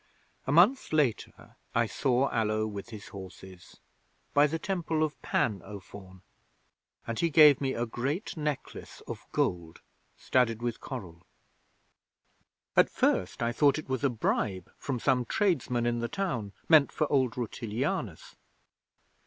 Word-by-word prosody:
'A - - +1
month 190 - +4
later 150 -7 -1 0.2
I 115 0 +3
saw 130 +3 +1
Allo 110 -1 0
with 105 +1 -6
his 110 -3 -10
horses 95 -1 -12 0.5
by 145 +1 +5
the 160 +2 -2
Temple 165 -3 -1
of 155 -1 -3
Pan, 105 -4 0
O 100 0 -8
Faun 95 -1 -13 0.8
and 115 -1 -4
he 170 - +2
gave 150 -3 +7
me 135 -1 -1
a 120 - -1
great 135 - -3
necklace 150 -3 -5
of - - -7
gold 85 -2 -1 0.4
studded 120 -3 +1
with 120 -2 -2
coral. 95 - -7 1.5
'At - - +5
first 95 +5 0
I 115 - +1
thought 145 +3 +3
it 155 - -7
was 130 +1 -2
a 140 - +4
bribe 100 -5 -1
from 130 -4 -4
some 125 0 +2
tradesman 130 - 0
in 120 0 0
the 120 - -1
town 125 - -3
meant 155 -4 +6
for 155 - 0
old 130 -4 +2
Rutilianus. 120 - -3
120 Hz, 145 wpm, -29 LUFS, 105-150 Hz, 1.5 s, gave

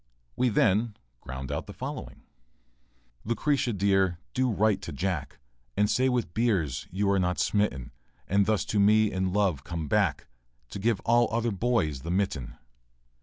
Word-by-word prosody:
We 125 0 +2
then 105 +1 +2 0.2
ground 65 +2 -6
out 75 - -3
the - - -8
following:] - - -7 1.0
Lucretia, 125 +2 0
dear, 95 -3 +2 0.2
do 130 0 +1
write 105 -2 +2
to 85 - -6
Jack, 75 -2 -3 0.4
And 105 +1 +3
say 130 +1 +2
with 120 -9 -1
Beers 95 - 0
you 100 +3 -1
are 100 - +2
not 90 0 0
smitten; 70 - 0 0.4
And 100 +1 +2
thus 110 -2 +1
to 105 - 0
me 105 +1 +4
in 95 0 -1
love 95 -8 +1
come 85 -2 -4
back, - - +1 0.5
And 100 - -5
give 110 -1 +1
all 120 0 +3
other 115 +1 0
boys 95 - 0
the 85 - -6
mitten. 90 -9 -2
100 Hz, 160 wpm, -28 LUFS, 85-110 Hz, 1.0 s, me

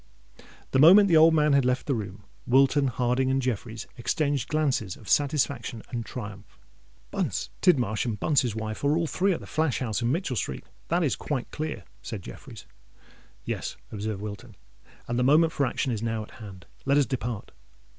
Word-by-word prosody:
The 130 - +2
moment 190 +7 +8
the 170 - +5
old 160 +1 +7
man 150 -1 +3
had 140 -1 +4
left 125 +1 0
the 140 - 0
room, 100 -3 -5 0.2
Wilton, 135 +2 +4
Harding, 125 +1 0
and 135 0 +2
Jeffreys 115 -3 -3
exchanged 140 +2 -1
glances 135 -11 0
of 110 - -15
satisfaction 140 -5 0
and 120 -2 -3
triumph. 105 -4 -9 0.5
"Bunce, - - -2
Tidmarsh, 125 - +2
and 110 -3 -3
Bunce's 130 -6 +1
wife 110 +1 -5
are 145 +2 +3
all 170 - +1
three 190 +5 +1
at 170 - -2
the - - -9
flash 155 -4 0
house 115 -3 -2
in 120 +1 +1
Mitchell 160 -4 -1
Street—that 170 +8 -3
is 145 - +1
quite 135 -5 -4
clear," 155 0 -4 0.2
said 105 -5 -6
Jeffreys. - - -11 0.8
"Yes," - - -4
observed 105 -1 -4
Wilton: 105 -2 -8 0.5
"and 120 +1 -1
the - - +2
moment 155 +5 +4
for 140 -3 +1
action 125 +2 -1
is 110 -3 -2
now 115 -1 -2
at - - -14
hand. 95 -5 -10 0.2
Let 140 +1 +3
us 145 - +4
depart." 120 -4 -4
130 Hz, 180 wpm, -27 LUFS, 110-150 Hz, 0.8 s, moment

